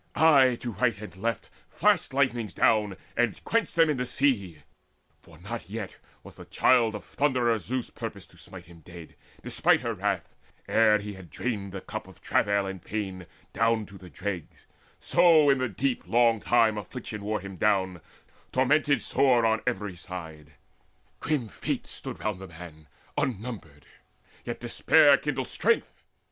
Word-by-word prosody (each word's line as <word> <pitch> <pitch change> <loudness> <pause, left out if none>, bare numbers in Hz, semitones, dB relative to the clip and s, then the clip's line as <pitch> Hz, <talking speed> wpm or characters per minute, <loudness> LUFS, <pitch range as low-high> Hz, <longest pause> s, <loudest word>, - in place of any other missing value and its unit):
Aye 140 -6 +5
to 120 - -3
right 105 +1 0
and 105 -5 -9
left 115 +5 -3 0.2
Flashed - - +2
lightnings 120 -7 0
down, 105 -4 +2 0.2
and 120 -2 0
quenched 230 0 0
them 165 -1 +5
in 150 -3 0
the 125 - -1
sea; 100 - 0 0.6
For 80 - -17
not 105 +2 -7
yet 105 -2 -6 0.3
was - - -13
the - - -11
Child 115 -4 +3
of 105 - -7
Thunderer 125 -5 +1
Zeus 125 +3 -4
Purposed - - -7
to - - -20
smite 90 -2 -11
him 85 0 -15
dead, 85 0 -12 0.3
despite - - +2
her - - -2
wrath, - - -2 0.3
Ere 110 -1 +4
he 105 0 -7
had 95 -3 -12
drained 105 -3 -4
the 95 0 -6
cup - - -7
of - - -16
travail 100 -1 +1
and 95 -2 -6
pain 95 -4 -5 0.3
Down 115 -1 +1
to 100 0 -13
the 90 0 -12
dregs; 95 -4 -6 0.3
so 165 -4 +5
in 135 - +2
the 130 -1 -1
deep 125 -9 -2
long 115 +2 +3
time 110 -1 +3
Affliction 105 +1 -7
wore 105 +1 -1
him 95 0 -9
down, 95 -3 +1 0.5
tormented 140 +2 +2
sore 125 -4 +3
On 110 0 +2
every 105 -6 -2
side. 80 -4 -9 0.7
Grim 145 -7 -1
Fates - - -4
stood - - -5
round 105 -3 -2
the 95 - -8
man 80 -3 -12 0.3
Unnumbered; 105 - -5 0.6
yet - - -5
despair - - +4
still - - -14
kindled - - -2
strength. - - 0
105 Hz, 165 wpm, -27 LUFS, 95-125 Hz, 0.7 s, Aye